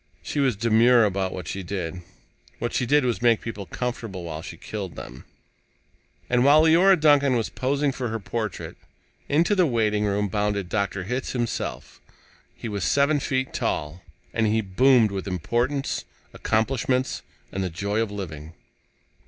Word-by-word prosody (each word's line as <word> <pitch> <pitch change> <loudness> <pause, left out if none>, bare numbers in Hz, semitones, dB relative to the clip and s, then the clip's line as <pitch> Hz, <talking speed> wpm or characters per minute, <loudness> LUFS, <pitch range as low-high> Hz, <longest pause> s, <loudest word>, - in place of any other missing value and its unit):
She 150 - -3
was 135 -5 +2
demure 115 +2 +5
about 95 -2 -1
what 90 -4 -6
she 95 - -4
did. 90 -2 -4 0.6
What 120 - -3
she 125 - 0
did 145 +1 +4
was 120 -2 -1
make 120 -2 +4
people 105 -4 -6
comfortable 115 -7 -4
while 80 -2 -5
she - - -9
killed 100 -5 -6
them. 65 - -9 1.0
And, 125 0 +2
while 145 +3 +6
Leora 175 +4 +5
Duncan 145 -3 +4
was 115 -2 0
posing 140 +2 0
for 130 -2 -4
her 115 0 -3
portrait, 110 -1 -4 0.5
into 165 +7 +3
the 185 -4 +3
waitingroom 105 -4 +1
bounded 105 -3 -1
Dr. 100 -2 -1
Hitz 125 +7 -3
himself. 120 - -4 0.5
He - - -7
was 100 -3 -3
seven 140 - +3
feet 130 -1 -2
tall, 75 +4 -2 0.3
and 110 -1 +1
he 110 +1 +2
boomed 115 +3 +4
with 100 0 -4
importance, 120 - -1 0.3
accomplishments, 130 +3 0 0.3
and 95 - -2
the 95 - -2
joy 100 +5 -2
of 115 - -1
living. 80 -6 -7
110 Hz, 155 wpm, -24 LUFS, 100-130 Hz, 1.0 s, while